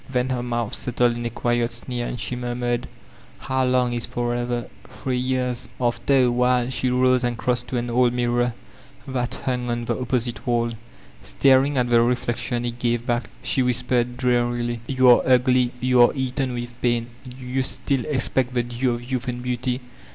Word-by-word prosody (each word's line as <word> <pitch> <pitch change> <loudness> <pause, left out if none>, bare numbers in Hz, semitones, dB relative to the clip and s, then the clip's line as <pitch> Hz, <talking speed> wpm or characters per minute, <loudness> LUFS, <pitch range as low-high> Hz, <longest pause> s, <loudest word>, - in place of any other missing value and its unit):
Then 125 0 0
her 125 -2 -1
moadi 120 -1 -2
settled 120 -1 +1
in 120 0 -3
a - - -3
quiet 120 0 0
sneer 120 0 -3
and 125 - -5
she 125 - -3
murmured: 120 0 -2 0.5
^How 130 -1 0
Umg 125 -1 +2
is 120 -1 -1
'forever'? 120 0 -2 0.2
Three 130 -1 -3
years.'* 125 -1 -1
After 120 +2 +1
a 125 - +3
while 125 0 +2
she 130 0 0
rose 125 0 +3
and 120 -1 -1
crossed 125 0 -1
to 125 - -2
an 120 0 -2
old 125 0 +3
mirror 120 -1 0 0.5
that 125 -2 -2
hung 125 -1 -1
on 120 0 -2
the - - -1
opposite 125 -1 -2
waH. 120 -1 +1 0.5
Staring 135 +1 +3
at 125 -1 +1
the 120 -1 +6
reflection 120 0 -1
it 120 0 -4
gave 120 -1 0
back, 120 -1 -1
she 130 +1 +2
whbpexed 125 0 +1
drearily: 120 -1 0
"You 130 -1 +3
are 120 - +8
ugly, 125 -1 +3
you 125 0 +4
are 120 - +6
eaten 130 -1 -2
with 120 0 -7
pain 120 -1 +1 0.2
I 130 - -10
Do 125 +1 -11
you 130 +1 -1
still 130 0 -1
expect 130 -2 0
the 120 - +2
due 120 +1 -1
of 120 - -8
youth 130 +1 -3
and 125 0 -4
beauty? 125 +1 -2
125 Hz, 190 wpm, -23 LUFS, 120-125 Hz, 0.5 s, are